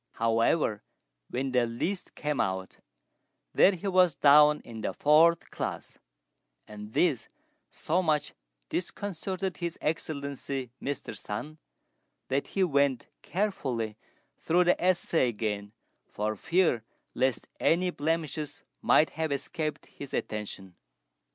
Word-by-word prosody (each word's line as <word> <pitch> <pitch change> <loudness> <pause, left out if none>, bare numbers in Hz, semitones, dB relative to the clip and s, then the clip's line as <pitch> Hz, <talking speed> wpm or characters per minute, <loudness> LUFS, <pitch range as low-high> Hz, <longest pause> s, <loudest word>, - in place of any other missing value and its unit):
However, 115 0 +2 0.5
when 130 +2 -2
the 125 -2 +2
list 165 +12 -3
came 150 -2 -1
out, 95 0 -3 0.8
there 200 - +6
he 180 +3 -5
was 180 -5 +4
down 150 +1 +6
in 115 -2 -9
the - - -2
fourth 165 +3 +4
class; - - -5 0.7
and 105 0 -9
this 155 -10 +2 0.4
so 175 +4 0
much 155 -4 0 0.4
disconcerted 190 0 -3
His 170 -2 -4
Excellency 140 -4 -3
Mr. 140 -1 -4
Sun, 150 +10 -6 0.7
that 135 +1 0
he 195 - 0
went 140 -6 +1
carefully 135 - -2 0.4
through 175 +2 +3
the 175 0 +2
essay 175 -6 +2
again 105 -3 -3 0.4
for 110 +1 -2
fear 160 - +2 0.3
lest 130 -2 0
any 180 +2 +2
blemishes 155 -1 -2 0.2
might 155 - +4
have 160 -1 -2
escaped 155 +2 -3
his 140 - -8
attention. 100 -4 -5
145 Hz, 115 wpm, -29 LUFS, 115-170 Hz, 0.8 s, there